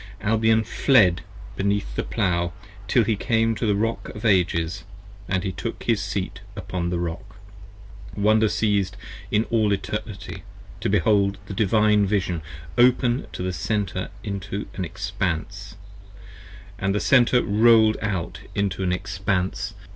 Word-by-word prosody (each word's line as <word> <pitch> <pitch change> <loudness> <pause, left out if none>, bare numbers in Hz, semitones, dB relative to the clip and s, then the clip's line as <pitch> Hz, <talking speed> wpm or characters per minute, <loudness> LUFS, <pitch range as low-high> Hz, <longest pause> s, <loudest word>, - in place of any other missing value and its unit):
Albion 110 +1 +3
fled 105 - +3 0.3
beneath 100 -9 -1
the - - 0
Plow 85 -1 -1 0.3
Till - - +4
he 110 - +1
came 115 +2 +1
to 110 +1 -2
the 105 - +2
Rock 115 +3 -2
of 105 - -7
Ages, 90 -4 +1 0.2
& 100 -2 -4
he 95 - -2
took - - -5
his - - +1
Seat - - -4
upon 85 -2 -3
the 90 - -1
Rock. 85 +3 -5 0.8
Wonder 110 +2 +4
siez'd 100 -4 0 0.5
all 110 -2 +3
in 100 - +2
Eternity: 100 +1 -5 0.4
to - - -1
behold 100 -2 +2
the 100 - -7
Divine 105 0 +3
Vision 95 -4 0 0.4
open 125 0 +3
18 90 - -5
The 95 - -2
Center 95 -2 -2
into 100 -1 -4
an 95 - -3
Expanse, 95 -3 -4 0.5
& - - -18
the 95 +2 0
Center 125 0 +4
rolled 110 0 +5
out 95 -6 -3 0.2
into 100 -1 -1
an 90 -1 0
Expanse. 95 +1 -2
100 Hz, 140 wpm, -24 LUFS, 95-110 Hz, 0.8 s, rolled